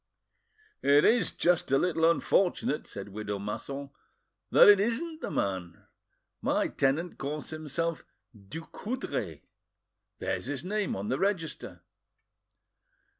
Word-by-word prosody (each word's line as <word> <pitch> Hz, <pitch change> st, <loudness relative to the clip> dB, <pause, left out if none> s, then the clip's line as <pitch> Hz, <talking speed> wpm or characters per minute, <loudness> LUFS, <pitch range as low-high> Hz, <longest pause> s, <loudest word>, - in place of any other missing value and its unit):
"It 145 Hz, +1 st, +5 dB
is 225 Hz, -4 st, +4 dB
just 175 Hz, -5 st, +1 dB
a 135 Hz, -, +5 dB
little 165 Hz, 0 st, +3 dB
unfortunate," 170 Hz, -3 st, +1 dB
said 100 Hz, 0 st, -7 dB
widow 105 Hz, 0 st, -4 dB
Masson, 135 Hz, +7 st, -5 dB, 0.6 s
"that -, -, +7 dB
it 205 Hz, -1 st, +8 dB
isn't 310 Hz, +10 st, -1 dB
the -, -, -3 dB
man. 90 Hz, -4 st, -3 dB, 0.6 s
My -, -, +1 dB
tenant 155 Hz, +6 st, 0 dB
calls 150 Hz, +3 st, -4 dB
himself 155 Hz, +1 st, -3 dB, 0.3 s
Ducoudray. 110 Hz, -, -5 dB, 0.7 s
There's -, -, -2 dB
his 145 Hz, +4 st, -4 dB
name 205 Hz, +1 st, -1 dB
on 100 Hz, +2 st, -4 dB
the 130 Hz, -, 0 dB
register." 185 Hz, -6 st, -2 dB
155 Hz, 115 wpm, -29 LUFS, 110-180 Hz, 0.7 s, it